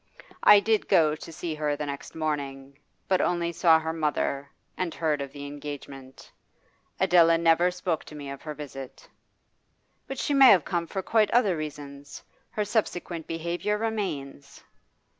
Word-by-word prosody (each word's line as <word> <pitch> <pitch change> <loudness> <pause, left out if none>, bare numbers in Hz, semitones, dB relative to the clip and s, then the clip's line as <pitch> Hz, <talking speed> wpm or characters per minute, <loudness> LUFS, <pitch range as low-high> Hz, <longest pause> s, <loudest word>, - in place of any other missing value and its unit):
I 210 -1 +8
did 220 +1 +1
go 155 -2 +4
to 165 - -10
see 165 0 -5
her 150 -1 -1
the 150 - -4
next 140 -1 -7
morning, 140 -3 -4 0.3
but 185 -1 +2
only 170 -1 0
saw 165 -1 +5
her 160 0 -3
mother, 145 -3 -1 0.3
and 180 -3 -3
heard 155 -3 0
of 140 -1 -5
the 145 0 -8
engagement. 140 -2 -9 0.7
Adela 165 -1 +5
never 170 +1 +4
spoke 180 -2 -3
to 150 - -11
me 145 -1 -8
of 140 - -8
her 150 -1 -6
visit.' 135 -3 -9 1.0
'But 270 - -6
she 290 - -1
may 270 -2 +8
have 180 -9 +5
come 170 -2 -2
for 190 +1 -4
quite 215 0 +2
other 220 -7 +3
reasons. 145 -2 -8 0.3
Her 210 - -2
subsequent 175 -6 -2
behaviour 170 +5 -2
remains. 170 -11 -4
160 Hz, 160 wpm, -27 LUFS, 145-180 Hz, 1.0 s, I